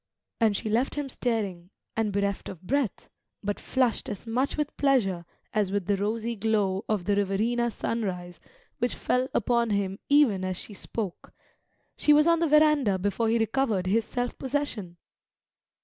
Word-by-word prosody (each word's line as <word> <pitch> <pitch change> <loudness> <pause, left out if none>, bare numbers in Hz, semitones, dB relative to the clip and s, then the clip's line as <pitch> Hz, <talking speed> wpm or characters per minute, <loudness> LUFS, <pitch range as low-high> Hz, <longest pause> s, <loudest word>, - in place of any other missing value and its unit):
And 220 -4 +3
she - - -4
left 230 +5 +1
him 290 -1 -2
staring, 205 -9 -2 0.3
and 220 -2 0
bereft 200 0 -1
of 185 -1 -10
breath, 265 +2 -1 0.4
but 205 0 -2
flushed 255 -4 0
as 205 - -6
much 250 +6 0
with 300 -1 -2
pleasure 205 -11 +2 0.3
as 210 -3 +1
with 200 -2 -1
the 205 - +2
rosy 220 +4 -2
glow 205 -3 +1
of 210 -5 0
the 205 - +2
Riverina 220 +5 +1
sunrise 185 -7 -3 0.4
which 245 +1 0
fell 250 +1 0
upon 235 0 +1
him 200 -2 -1
even 275 -10 +4
as 185 -1 -2
she 210 - -6
spoke; 200 -1 -5 0.6
she 300 - +5
was 300 +1 +5
on 335 -1 +4
the 335 - +2
verandah 300 -9 +4
before 205 +4 0
he 230 - +3
recovered 225 -4 +1
his 220 +5 +2
self 245 0 -3
possession. 255 -10 -3
220 Hz, 165 wpm, -27 LUFS, 195-250 Hz, 0.6 s, she